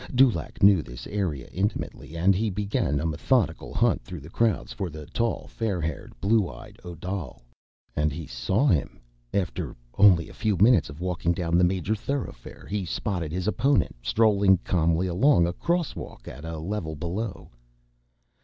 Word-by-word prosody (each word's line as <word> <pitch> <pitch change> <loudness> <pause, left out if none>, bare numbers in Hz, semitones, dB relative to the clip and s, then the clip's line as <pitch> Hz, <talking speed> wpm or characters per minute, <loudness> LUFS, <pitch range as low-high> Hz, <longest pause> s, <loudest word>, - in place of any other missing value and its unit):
Dulaq 130 -2 +2
knew 100 -4 +7
the - - -10
area 90 -11 -2
intimately, 95 -4 -3
and 95 +4 +4
he 105 +4 0
began 100 -8 0
a 80 - -2
methodical 85 - 0
hunt - - +2
through 75 +6 -8
the 75 +4 -12
crowds 115 0 0
for 95 -4 -3
the 75 -1 -9
tall, 115 +8 -1
fair 105 -6 -2
haired, 80 -4 -5
blue 105 -2 +2
eyed - - -12
Odal. 85 -5 -6 0.5
And 75 0 +1
he 80 +3 -6
saw 65 - 0
him! 85 - +1 0.3
After 90 -6 -2 0.2
only 95 -5 +6
a - - -12
few 105 -4 0
minutes 110 +1 +5
of 70 +3 -10
walking 90 -1 0
down 85 -1 -1
the 90 - +5
major 90 +3 +1
thoroughfare, 120 - -5
he 105 -1 -2
spotted 90 -2 -3
his 90 +2 -2
opponent, 135 +6 +2
strolling 100 - +4
calmly 85 0 +2
along 95 +3 +4
a 85 - -1
crosswalk, 170 - -3
at 75 - -8
the 80 0 -5
level 80 -1 -3
below. 90 +7 -4
90 Hz, 165 wpm, -26 LUFS, 80-105 Hz, 0.5 s, knew